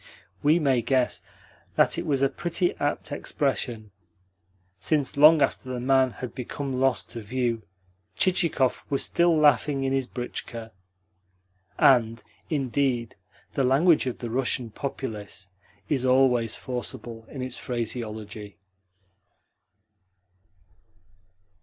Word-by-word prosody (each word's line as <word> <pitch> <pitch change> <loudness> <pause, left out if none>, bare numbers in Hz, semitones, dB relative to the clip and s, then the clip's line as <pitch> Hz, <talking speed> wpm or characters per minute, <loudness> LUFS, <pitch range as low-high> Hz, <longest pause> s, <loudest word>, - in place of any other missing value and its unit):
We 150 +3 +4
may 135 -7 +2
guess 130 +1 0 0.5
that - - +4
it 170 - -5
was 140 -2 +1
a - - +6
pretty 175 +3 -1
apt 145 +1 -2
expression, 125 -7 -2 0.9
since 145 - 0
long 150 +1 +7
after 130 -1 -2
the 125 - -3
man 130 +1 +3
had 125 0 -7
become 130 +1 -4
lost 135 -2 +1
to 115 - -6
view 120 +1 -1 0.6
Chichikov 170 -8 +2
was 140 - +1
still 170 -1 +3
laughing 145 -1 +3
in 135 0 0
his 135 -2 0
britchka. 115 -2 -6 1.1
And, 115 -3 +4 0.3
indeed, 130 -4 0 0.4
the 135 - +1
language 140 +4 +4
of 125 - -3
the 120 -2 -6
Russian 125 -2 -1
populace 105 -7 -6 0.4
is 135 -1 0
always 125 -3 +3
forcible 120 -2 -6
in 130 -3 -6
its 130 -1 -5
phraseology. 110 -4 -5
130 Hz, 115 wpm, -26 LUFS, 115-140 Hz, 1.1 s, long